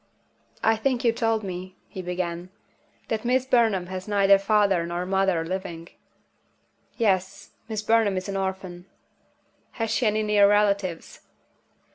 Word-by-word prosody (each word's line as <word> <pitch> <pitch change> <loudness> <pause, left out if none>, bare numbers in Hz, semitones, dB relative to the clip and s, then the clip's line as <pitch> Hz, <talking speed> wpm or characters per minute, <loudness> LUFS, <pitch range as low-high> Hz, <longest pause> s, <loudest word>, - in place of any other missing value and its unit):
"I 225 0 +3
think 250 +1 -1
you 230 - +5
told 225 -2 0
me," 185 -1 -6
he 190 - -7
began, 180 0 -4 0.6
"that 220 -1 -2
Miss 250 +1 +1
Burnham 225 -8 +2
has 185 +1 -7
neither 200 -1 +4
father 200 -3 +2
nor 175 +1 -3
mother 190 -3 +1
living?" 175 -2 -5 1.1
"Yes. 190 -5 -1 0.2
Miss 215 -1 -3
Burnham 220 -3 +2
is 185 - -4
an 200 - -4
orphan." 190 -2 -4 0.9
"Has 225 -1 -3
she 225 +1 +1
any 215 +1 +1
near 205 -1 +4
relatives?" 200 -4 0
195 Hz, 135 wpm, -25 LUFS, 185-220 Hz, 1.1 s, you